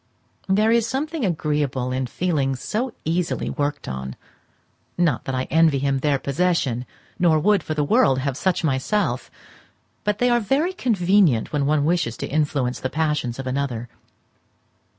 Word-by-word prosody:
There 210 +3 +3
is 230 -1 +3
something 295 +4 -2
agreeable 150 - -1
in 130 0 -1
feelings 140 -4 -1
so 225 - -3
easily 170 +2 -1
worked 145 -1 -2
on; 65 0 -5 0.8
not 175 -3 +1
that 135 - -2
I 130 - 0
envy 160 -3 +4
him 135 0 0
their 145 0 +1
possession, 140 -5 0 0.3
nor 170 -3 +4
would, 200 +5 +3
for 155 - -4
the 150 - +1
world, 135 -2 +3
have 135 0 -2
such 185 +4 0
myself; 155 +8 0 0.7
but 210 -1 0
they 245 +2 +2
are 240 - +4
very 280 - 0
convenient 190 - +2
when 140 -2 +1
one 150 -1 +2
wishes 160 -9 0
to - - -4
influence 140 -4 0
the 130 - -3
passions 150 -6 -1
of 135 - -5
another. 130 -3 -3
150 Hz, 155 wpm, -22 LUFS, 135-190 Hz, 0.8 s, envy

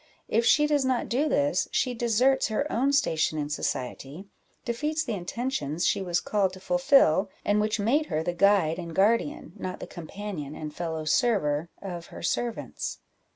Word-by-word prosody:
If 230 +2 +2
she 295 - +5
does 295 -2 +2
not 260 -2 0
do 280 +6 +1
this, 285 0 +1
she 255 - +1
deserts 240 +3 +2
her 220 +6 -1
own 265 +4 +2
station 160 - +1
in 145 -1 -2
society, 140 +4 -4 0.4
defeats 300 +7 -1
the 235 - -3
intentions 180 - -2
she - - +2
was 175 -2 0
called 195 -2 0
to 190 - -10
fulfil, 265 - +3 0.2
and 205 +1 +3
which 215 +1 0
made 280 +9 +2
her 155 - -1
the 175 - -1
guide 185 -3 +3
and 170 -2 -7
guardian, 230 - +1
not 185 -1 -5
the - - -6
companion 170 -3 -7
and 150 -1 -6
fellow 160 -2 -4
server, 155 -5 +1
of 175 -3 -6
her - - -10
servants. 235 +7 -2
205 Hz, 170 wpm, -27 LUFS, 165-250 Hz, 0.4 s, she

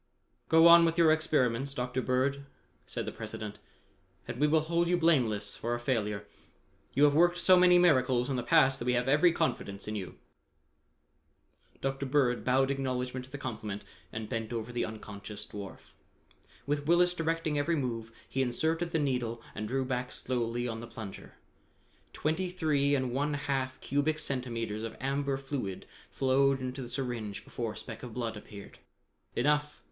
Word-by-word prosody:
"Go 165 0 +7
on 170 0 +9
with 165 0 +1
your 165 -2 +6
experiments, 140 -4 +1
Dr. 125 0 -2
Bird," 135 +2 0 0.4
said - - -4
the - - -4
President, 105 -1 -7 0.7
"and 120 - -5
we 150 - +4
will 155 +1 +4
hold 170 +2 +1
you 180 +1 +3
blameless 120 -12 +2
for 120 +1 -2
a - - -4
failure. 105 -5 -1 0.7
You 140 - +4
have 145 -1 +6
worked 175 +3 +4
so 185 - +6
many 180 0 +6
miracles 130 -8 +4
in 135 - -1
the 125 - 0
past 135 0 +4
that 120 - -4
we 125 - +2
have 125 +1 +1
every 150 +6 +5
confidence 105 - -2
in 105 - -3
you." 95 -4 -6 1.6
Dr. 135 0 -2
Bird 130 -3 +2
bowed 135 +2 +3
acknowledgment 130 -1 -2
to 130 - -20
the 145 - -5
compliment 110 -6 -5 0.3
and 110 -1 -5
bent 115 -1 -3
over 115 0 -4
the 120 - -1
unconscious 105 -1 -8
dwarf. 100 -2 -9 0.7
With 145 0 -1
Willis 175 +1 +4
directing 165 -3 -1
every 165 +4 +1
move, 115 -5 -3 0.2
he 135 - -1
inserted 160 +7 0
the 165 - 0
needle 125 -6 -1
and 110 +1 -4
drew 130 +3 -1
back 125 -1 -2
slowly 120 -1 -2
on 115 -1 -4
the 115 - -8
plunger. 110 -4 -9 0.8
Twenty 180 +4 -1
three 150 -5 +1
and 130 -3 -1
one 145 +3 0
half 135 -2 -2
cubic 145 +3 0
centimeters 115 -7 -3
of 115 0 -6
amber 140 +1 -1
fluid 135 -8 -4 0.2
flowed 135 +1 +2
into 130 +1 -4
the 120 - -6
syringe 120 -6 -4
before 115 -3 -4
a - - -11
speck 115 -3 -8
of 120 -3 -8
blood 115 -3 -2
appeared. 105 -1 -11 0.6
"Enough!" 150 0 +1
130 Hz, 170 wpm, -30 LUFS, 115-150 Hz, 1.6 s, on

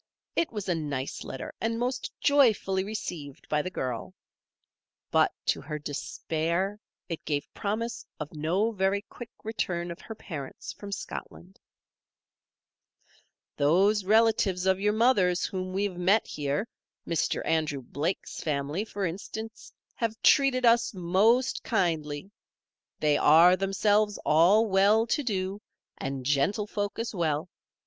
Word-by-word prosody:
It 335 - +1
was 210 -3 -5
a 180 - +2
nice 145 -5 -3
letter 135 - -7
and 230 +1 0
most 250 +2 -2
joyfully 220 -9 +3
received 175 -9 -6
by 150 0 +2
the 185 - -4
girl; 125 -10 -4 1.0
but - - +4
to - - +1
her 150 +1 -5
despair 165 +6 -2 0.3
it 165 -3 -5
gave 145 -2 -3
promise 225 +3 -3 0.2
of 150 0 -6
no 175 +9 0
very 195 -1 0
quick 240 -2 -10
return 175 -6 -2
of 170 - -9
her 225 - -8
parents 150 -10 -7
from 200 -1 -9
Scotland: 190 -2 -7 2.0
"Those 190 +8 +3
relatives 210 -3 +3
of 190 0 +3
your 210 +1 +2
mother's 210 -6 +3
whom 185 -1 -4
we 195 +2 -1
have 195 -3 -2
met 195 +5 +3
here, 145 +8 -2 0.4
Mr. 170 - 0
Andrew 155 -4 0
Blake's 150 +9 -3
family, 150 +4 -1
for 205 -3 -3
instance, 220 +5 -6 0.2
have 225 -1 -2
treated 270 -3 +5
us 235 -2 +4
most 205 +9 +2
kindly. 165 -5 -1 0.7
They 150 -1 +3
are, 165 +4 +7
themselves, 205 +2 +2
all 180 +9 +5
well 205 +2 +4
to 235 - 0
do, 195 -3 -2 0.4
and 135 -1 -4
gentlefolk 205 +8 0
as 230 0 -3
well. 160 -3 -1
190 Hz, 130 wpm, -28 LUFS, 160-215 Hz, 2.0 s, are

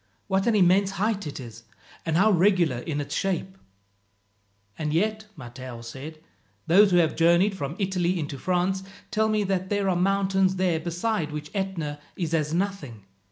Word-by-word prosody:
"What 190 +2 0
an 230 - +3
immense 190 0 +4
height 200 -2 0
it 145 - -6
is, 115 -3 -9 0.5
and 160 0 +1
how 215 +4 +5
regular 180 -7 +3
in 150 +3 -3
its 145 - -4
shape!" 190 0 -2 1.2
"And 150 +2 -3
yet," 215 +4 0
Matteo 120 0 -9
said, 135 +7 -8 0.5
"those 200 +5 +6
who 180 - +3
have 165 -3 +3
journeyed 170 +5 +4
from 155 -3 -4
Italy 185 -2 0
into 145 -3 -5
France 185 +3 0 0.3
tell 220 -1 +2
me 215 -1 +1
that 190 -1 -1
there 205 -1 0
are 185 - +2
mountains 190 0 +2
there 180 -3 +1
beside 175 0 -2
which 150 0 -6
Etna 175 -7 -3 0.2
is 170 -3 -3
as 155 -2 +1
nothing. 165 - -3
180 Hz, 165 wpm, -26 LUFS, 155-195 Hz, 1.2 s, those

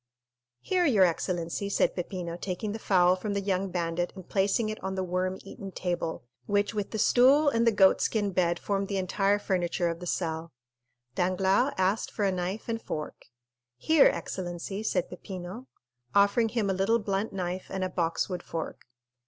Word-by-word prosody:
"Here, 365 -1 +1
your 215 -9 +5
excellency," 175 +2 -2
said - - +1
Peppino, 175 -1 -4
taking 185 +4 -4
the 220 - -5
fowl 180 -3 +4
from 200 +2 -4
the - - +1
young 195 -1 -1
bandit 175 0 -1
and 185 -2 -10
placing 205 +3 +1
it 215 - -6
on 190 0 -2
the 190 - -1
worm 185 +1 -1
eaten 195 0 -8
table, 175 -3 -3 0.2
which 205 +1 +1
with 205 -2 -2
the 220 - -4
stool 265 +7 +5
and 230 -3 +1
the - - +6
goat 195 -2 +5
skin 205 -3 0
bed 175 -2 +1
formed 200 +1 -1
the 200 - -2
entire 195 +2 +1
furniture 180 -3 0
of 165 0 -4
the 180 - -7
cell. 165 -1 -2 0.6
Danglars 190 - +2
asked 190 +3 +1
for 205 - -1
a 195 - +2
knife 185 +3 -3
and 230 -1 -2
fork. 155 -1 -6 0.5
"Here, 315 - +5
excellency," 180 +2 -3
said 220 -5 0
Peppino, 185 +6 -8 0.5
offering 200 +3 +4
him 225 -3 0
a 195 - +1
little 195 +5 +2
blunt 205 -1 -2
knife 185 -1 -4
and 190 -1 -3
a - - +1
boxwood 175 +1 -1
fork. 165 -2 -6
190 Hz, 175 wpm, -28 LUFS, 180-205 Hz, 0.6 s, the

